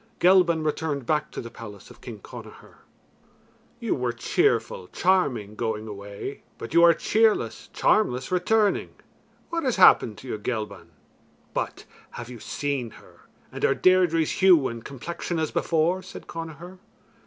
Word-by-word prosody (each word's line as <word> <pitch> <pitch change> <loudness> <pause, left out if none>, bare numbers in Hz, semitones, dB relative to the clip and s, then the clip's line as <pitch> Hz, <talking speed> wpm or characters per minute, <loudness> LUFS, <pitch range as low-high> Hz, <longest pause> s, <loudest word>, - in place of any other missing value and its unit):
Gelban 175 -3 +4
returned 150 -3 -2
back 150 +1 0
to - - -6
the 115 - -9
palace 105 -4 -11
of - - -17
King - - -9
Connachar. - - -12 1.0
"You 235 -4 -1
were 125 -2 -1
cheerful, 115 -5 0
charming, 135 - +1
going 110 -1 -3
away, 100 -1 -7 0.2
but 115 - -8
you 170 - +6
are 170 0 +8
cheerless, 215 - +1
charmless, 130 -12 +1
returning. 205 +3 +1 0.6
What 335 0 -1
has 255 -4 +1
happened 115 - +6
to 130 - -11
you, 110 - -4
Gelban? 105 -6 -4 0.7
But - - -4 0.3
have 120 0 -7
you 120 - -9
seen 140 -1 -3
her, - - -21 0.2
and - - -7
are - - +3
Deirdre's 180 -4 +3
hue 175 -8 +6
and 115 -1 -7
complexion 170 +5 -5
as 160 -2 -1
before?" 170 +3 +1
said 185 +1 -11
Connachar. 165 +3 -8
155 Hz, 145 wpm, -25 LUFS, 115-180 Hz, 1.0 s, are